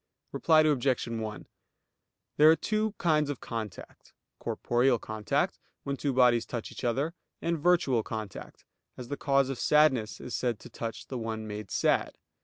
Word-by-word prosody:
Reply 160 Hz, -2 st, +4 dB
Obj. 140 Hz, -4 st, +2 dB
1: 110 Hz, -2 st, -5 dB, 0.9 s
There 150 Hz, +1 st, +8 dB
are 160 Hz, -, +7 dB
two 215 Hz, +3 st, -1 dB
kinds 150 Hz, -4 st, +2 dB
of 145 Hz, -, -3 dB
contact; 110 Hz, -3 st, -7 dB, 0.3 s
corporeal 120 Hz, +1 st, +1 dB
contact, 110 Hz, -1 st, -1 dB, 0.2 s
when 140 Hz, -, -2 dB
two 140 Hz, +1 st, -1 dB
bodies 125 Hz, -2 st, +4 dB
touch 120 Hz, -3 st, -5 dB
each -, -, -9 dB
other; 135 Hz, +7 st, 0 dB, 0.3 s
and 170 Hz, -1 st, -1 dB
virtual 150 Hz, -8 st, +3 dB
contact, 110 Hz, -2 st, -7 dB, 0.3 s
as 125 Hz, -1 st, -8 dB
the 145 Hz, -, -2 dB
cause 135 Hz, -1 st, +2 dB
of 135 Hz, -, -4 dB
sadness 140 Hz, -8 st, +3 dB
is 125 Hz, -, -7 dB
said 120 Hz, -3 st, -1 dB
to -, -, -12 dB
touch 115 Hz, -1 st, -5 dB
the 130 Hz, -, -5 dB
one 110 Hz, -1 st, -4 dB
made 105 Hz, -2 st, -6 dB
sad. -, -, +1 dB
125 Hz, 160 wpm, -29 LUFS, 115-150 Hz, 0.9 s, There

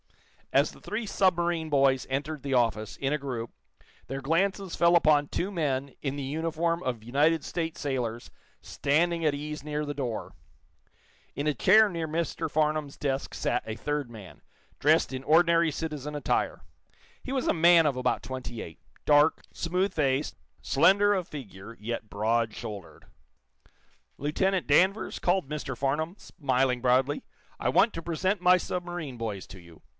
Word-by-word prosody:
As -, -, +3 dB
the -, -, -17 dB
three 220 Hz, +2 st, -4 dB
submarine 175 Hz, -5 st, +1 dB
boys 135 Hz, -2 st, +3 dB
entered 145 Hz, +2 st, -3 dB
the 135 Hz, -2 st, -1 dB
office, 110 Hz, -3 st, 0 dB
in 135 Hz, +1 st, -1 dB
a -, -, +1 dB
group, 125 Hz, -5 st, -5 dB, 0.6 s
their 135 Hz, +1 st, -4 dB
glances 185 Hz, +6 st, 0 dB
fell 170 Hz, 0 st, +5 dB
upon 150 Hz, -3 st, +3 dB
two 180 Hz, +6 st, -2 dB
men, 140 Hz, -7 st, -2 dB
in 140 Hz, -1 st, -3 dB
the 140 Hz, -, -4 dB
uniform 165 Hz, +4 st, -1 dB
of 120 Hz, -4 st, -3 dB
United 150 Hz, +6 st, +2 dB
States 165 Hz, -1 st, -3 dB
sailors, 120 Hz, -5 st, -3 dB, 0.3 s
standing 165 Hz, +4 st, 0 dB
at 150 Hz, -2 st, +2 dB
ease 150 Hz, +1 st, -6 dB
near 150 Hz, 0 st, -3 dB
the 145 Hz, -, -3 dB
door. 125 Hz, -6 st, -4 dB, 1.0 s
In 145 Hz, +3 st, -2 dB
a 150 Hz, -, +2 dB
chair 215 Hz, -, +6 dB
near 170 Hz, -4 st, -3 dB
Mr. 160 Hz, 0 st, -2 dB
Farnum's 155 Hz, -2 st, 0 dB
desk 135 Hz, -2 st, -2 dB
sat 125 Hz, -, -1 dB
a 110 Hz, -, -4 dB
third 145 Hz, -3 st, -2 dB
man, 105 Hz, -6 st, -12 dB, 0.4 s
dressed 155 Hz, -1 st, +3 dB
in 130 Hz, 0 st, -4 dB
ordinary 165 Hz, +2 st, +4 dB
citizen 150 Hz, -1 st, -5 dB
attire. 145 Hz, -, -1 dB, 0.6 s
He 260 Hz, -, -6 dB
was 265 Hz, -2 st, -1 dB
a -, -, +3 dB
man 170 Hz, 0 st, +6 dB
of 145 Hz, -3 st, +1 dB
about 125 Hz, 0 st, -1 dB
twenty 125 Hz, -3 st, -6 dB
eight, 80 Hz, -, -10 dB, 0.3 s
dark, 150 Hz, +1 st, +4 dB
smooth 180 Hz, +4 st, -1 dB
faced, 140 Hz, -2 st, 0 dB, 0.3 s
slender 200 Hz, +8 st, +4 dB
of 185 Hz, -4 st, -2 dB
figure, 115 Hz, -6 st, -9 dB
yet 110 Hz, 0 st, -5 dB
broad 110 Hz, +2 st, 0 dB
shouldered. 105 Hz, -6 st, -8 dB, 1.1 s
"Lieutenant 185 Hz, +6 st, 0 dB
Danvers," 190 Hz, +8 st, +3 dB
called 180 Hz, -3 st, +1 dB
Mr. 140 Hz, -4 st, -5 dB
Farnum, 150 Hz, +6 st, -1 dB
smiling 130 Hz, -8 st, -1 dB
broadly, 130 Hz, +3 st, +2 dB, 0.3 s
"I 125 Hz, -, -1 dB
want 205 Hz, -, +4 dB
to 165 Hz, -, -5 dB
present 175 Hz, +4 st, -1 dB
my 180 Hz, 0 st, +6 dB
submarine 175 Hz, -6 st, -4 dB
boys 110 Hz, -5 st, -5 dB
to 95 Hz, -, -11 dB
you. 85 Hz, -2 st, -16 dB
150 Hz, 160 wpm, -28 LUFS, 130-170 Hz, 1.1 s, chair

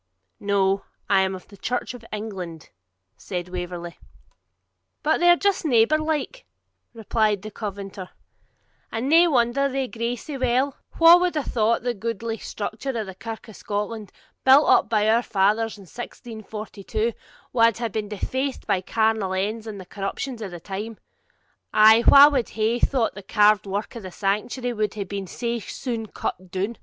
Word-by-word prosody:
'No; 195 Hz, -1 st, +1 dB, 0.3 s
I 195 Hz, -1 st, +5 dB
am 190 Hz, 0 st, 0 dB
of 185 Hz, -, -12 dB
the 200 Hz, -, -15 dB
Church 245 Hz, +5 st, -3 dB
of 245 Hz, -2 st, -11 dB
England,' 190 Hz, -7 st, -6 dB, 0.5 s
said 180 Hz, -2 st, -5 dB
Waverley. 175 Hz, -1 st, -6 dB, 1.1 s
'And 315 Hz, -, +2 dB
they're 350 Hz, 0 st, +7 dB
just 400 Hz, +2 st, +1 dB
neighbour 270 Hz, +1 st, +4 dB
like,' 310 Hz, -, -3 dB, 0.4 s
replied 215 Hz, -3 st, 0 dB
the 215 Hz, -, -7 dB
Covenanter; 200 Hz, -2 st, -6 dB, 0.8 s
'and 225 Hz, +4 st, -2 dB
nae 335 Hz, +4 st, +6 dB
wonder 270 Hz, -1 st, +2 dB
they 265 Hz, -1 st, -2 dB
gree 235 Hz, 0 st, -3 dB
sae 280 Hz, +3 st, -7 dB
weel. 255 Hz, +2 st, +1 dB, 0.2 s
Wha 335 Hz, +1 st, +9 dB
wad 360 Hz, -1 st, 0 dB
hae 300 Hz, -, 0 dB
thought 230 Hz, -2 st, +1 dB
the 245 Hz, -1 st, 0 dB
goodly 225 Hz, +1 st, -4 dB
structure 220 Hz, +5 st, -5 dB
of 220 Hz, -, -2 dB
the 190 Hz, -, -8 dB
Kirk 225 Hz, +5 st, -8 dB
of 220 Hz, -, -12 dB
Scotland, 210 Hz, 0 st, -4 dB, 0.3 s
built 270 Hz, +3 st, +7 dB
up -, -, +4 dB
by 215 Hz, -2 st, +2 dB
our 225 Hz, +2 st, +4 dB
fathers 215 Hz, +1 st, +1 dB
in 200 Hz, -, -13 dB
1642, 220 Hz, 0 st, -5 dB, 0.4 s
wad 230 Hz, -3 st, +4 dB
hae 235 Hz, 0 st, -1 dB
been 215 Hz, -1 st, -4 dB
defaced 260 Hz, +6 st, -3 dB
by 185 Hz, -, +1 dB
carnal 220 Hz, -1 st, 0 dB
ends 215 Hz, +4 st, -2 dB
and 210 Hz, -2 st, -6 dB
the 185 Hz, -, -9 dB
corruptions 220 Hz, +6 st, -5 dB
of 205 Hz, -, -4 dB
the 175 Hz, -1 st, -8 dB
time; 205 Hz, +5 st, -6 dB, 0.8 s
ay, 220 Hz, +2 st, +7 dB
wha 280 Hz, +1 st, +10 dB
wad 270 Hz, -5 st, 0 dB
hae 220 Hz, +2 st, 0 dB
thought 245 Hz, -4 st, +1 dB
the 200 Hz, -, -9 dB
carved 210 Hz, +1 st, +3 dB
work 200 Hz, +4 st, -4 dB
of 230 Hz, -, -6 dB
the 185 Hz, -2 st, -8 dB
sanctuary 215 Hz, +6 st, -1 dB
would 215 Hz, -2 st, -1 dB
hae 205 Hz, -, -2 dB
been 195 Hz, 0 st, -5 dB
sae 235 Hz, +5 st, -3 dB
soon 230 Hz, 0 st, -5 dB
cut 185 Hz, -1 st, -5 dB
down!' 195 Hz, +6 st, -2 dB
220 Hz, 170 wpm, -24 LUFS, 200-245 Hz, 1.1 s, wha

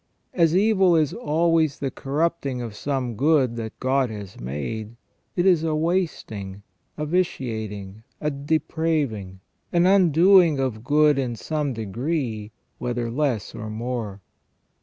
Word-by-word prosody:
As 165 Hz, -2 st, +3 dB
evil 195 Hz, -4 st, +4 dB
is 155 Hz, -3 st, +2 dB
always 165 Hz, -, +1 dB
the 135 Hz, -2 st, -3 dB
corrupting 140 Hz, -2 st, -1 dB
of 115 Hz, -4 st, -6 dB
some 130 Hz, -2 st, -2 dB
good 135 Hz, -1 st, +3 dB
that 110 Hz, -1 st, -6 dB
God 130 Hz, 0 st, +1 dB
has 100 Hz, -4 st, -8 dB
made, 105 Hz, -, -5 dB, 0.4 s
it 175 Hz, -, +1 dB
is 175 Hz, -4 st, +4 dB
a 160 Hz, -1 st, 0 dB
wasting, 155 Hz, -, -2 dB, 0.3 s
a 150 Hz, -, -2 dB
vitiating, 110 Hz, -, -2 dB, 0.2 s
a 150 Hz, -, -1 dB
depraving, 140 Hz, -, -1 dB, 0.3 s
an 175 Hz, 0 st, +3 dB
undoing 180 Hz, -2 st, +5 dB
of 120 Hz, -5 st, -2 dB
good 150 Hz, +1 st, +4 dB
in 125 Hz, -3 st, -2 dB
some 145 Hz, +7 st, -2 dB
degree, 115 Hz, -, -3 dB, 0.3 s
whether 120 Hz, -1 st, -2 dB
less 130 Hz, -5 st, -1 dB
or 110 Hz, 0 st, -6 dB
more. 110 Hz, -3 st, -4 dB
135 Hz, 130 wpm, -24 LUFS, 110-160 Hz, 0.4 s, undoing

